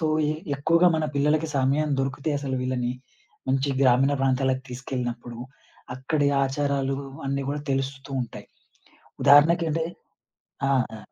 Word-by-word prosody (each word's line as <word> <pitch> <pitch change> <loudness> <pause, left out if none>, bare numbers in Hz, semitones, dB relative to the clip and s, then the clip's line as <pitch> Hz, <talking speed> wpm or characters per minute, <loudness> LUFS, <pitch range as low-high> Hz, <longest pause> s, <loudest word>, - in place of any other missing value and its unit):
So, 160 - +1 0.3
ఎ - - -4 0.2
ఎక్కువగా 165 +5 +4
మన 155 - 0
పిల్లలకి 150 +3 +2
సమయం 140 +3 +1
దొరికితే 135 +3 -2
అసలు 135 -2 -3
వీళ్ళని, 125 -1 -1 0.6
మంచి 135 +1 +1
గ్రామీణ 135 +2 +4
ప్రాంతాలకి 130 0 +1
తీసుకెళ్ళినప్పుడు. 120 -2 -5 0.6
అక్కడి 145 +2 0 0.2
ఆచారాలు 135 0 -1 0.3
అన్నీ 140 0 -1
గూడా 145 0 -3
తెలుస్తూ 135 +1 -3
ఉంటాయి. 120 - -9 0.8
ఉదాహరణకి 150 +4 +6
అంటే 160 +1 0 0.8
ఆ! - - +1 0.3
ఆ! - - -8
135 Hz, 125 wpm, -25 LUFS, 130-145 Hz, 0.8 s, ఉదాహరణకి